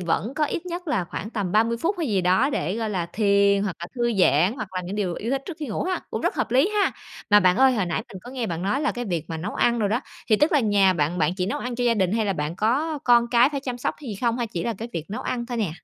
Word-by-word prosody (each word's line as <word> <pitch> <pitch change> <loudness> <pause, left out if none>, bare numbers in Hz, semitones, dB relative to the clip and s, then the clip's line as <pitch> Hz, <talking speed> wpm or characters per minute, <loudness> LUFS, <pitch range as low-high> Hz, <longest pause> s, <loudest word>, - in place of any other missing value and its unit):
vẫn 185 - -1
có 305 - +1
ít 335 +4 -4
nhất 350 -1 -5
là 205 -11 0
khoảng 210 +5 -6
tầm 200 -6 -3
30 230 +2 +3
phút 350 - -1
hay 320 - -1
gì 200 -4 +1
đó 190 +11 +3
để, 180 - -2
gọi 220 -2 -2
là, 175 -4 -2
thiền 200 -1 +3
hoặc 195 -4 -3
là 170 - -4
thư 240 -1 0
giãn 175 +5 +4
hoặc 215 -6 -5
làm 180 -1 -3
những 195 +3 -4
điều 185 -5 -1
yêu 230 - -4
thích 275 0 -1
trước 345 -5 -6
khi 300 - -4
ngủ 215 - -2
ha, 370 0 -1
cũng - - -3
rất - - 0
hợp - - -1
lý 265 +8 +4
ha. - - +1 0.4
Mà 210 0 +7
bạn 185 +1 +4
ơi, 265 0 +5
hồi 205 -6 0
nãy 170 - -2
mình 190 - -9
có 245 - -10
nghe 255 -3 -3
bạn 170 -2 -4
nói 205 +8 0
là 300 - 0
cái 245 -1 -4
việc 170 -6 -2
mà 165 - -3
nấu 180 +6 -5
ăn 240 0 +2
đồ 205 -2 +1
đó, 230 +4 0 0.3
thì 215 - +5
tức 300 +8 +2
là 295 - +4
nhà 200 -4 +4
bạn 170 +1 -1
bạn 160 +2 +1
chỉ 180 -1 -1
nấu 205 - -2
ăn 245 0 -4
cho 245 +1 -1
gia 235 -1 +3
đình 190 -2 +1
hay 225 -1 +1
là 195 - +1
bạn 150 +1 -3
có 285 +9 0
con 240 -1 +5
cái 240 +2 +5
phải 280 -2 -3
chăm 250 -2 -5
sóc - - -2
hay 275 - -8
gì - - -4
không 235 -1 +1
hay - - 0
là - - -6
chỉ 170 - -3
là 235 - -1
cái 230 +2 -5
việc 165 +2 -5
nấu 215 - -4
ăn 235 -1 -3
thôi 240 -1 -4
nè? 205 -8 0
220 Hz, 330 wpm, -24 LUFS, 185-250 Hz, 0.4 s, Mà